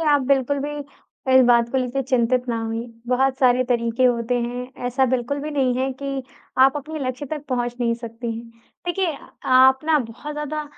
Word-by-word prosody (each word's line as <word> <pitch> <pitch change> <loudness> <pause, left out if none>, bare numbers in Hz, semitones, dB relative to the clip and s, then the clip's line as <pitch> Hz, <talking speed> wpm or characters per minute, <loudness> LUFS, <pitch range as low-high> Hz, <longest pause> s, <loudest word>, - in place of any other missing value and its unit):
आप 295 -3 +3
बिल्कुल 275 0 +2
भी 295 +1 -4 0.5
कोई 260 0 +7
बात 235 -1 +4
को 265 - +2
लेके 255 +2 -1
चिंतित 250 -1 +1
ना 230 -1 -1
होइए। 225 +1 -3 0.2
बहुत 260 +1 +1
सारे 255 -1 +4
तरीके 235 0 +1
होते 240 0 +2
हैं, 245 +2 -4 0.2
ऐसा 260 +2 +2
बिल्कुल 255 +3 -1
भी 300 - -4
नहीं 265 -4 +1
है 265 +1 0
कि 275 -1 -3 0.4
आप 265 +2 +6
अपने 305 +2 -5
लक्ष्य 255 +3 -4
तक 300 -2 -3
पहुँच 245 -1 -1
नहीं 235 -1 +2
सकती 230 0 -6
हैं। 230 0 -8 0.4
देखिए 370 +1 0
अ, - - -12 0.2
आप 260 +1 +6
ना 315 -1 +4
बहुत 250 +5 -6
ज़्यादा 300 0 -3
255 Hz, 195 wpm, -22 LUFS, 240-280 Hz, 0.5 s, कोई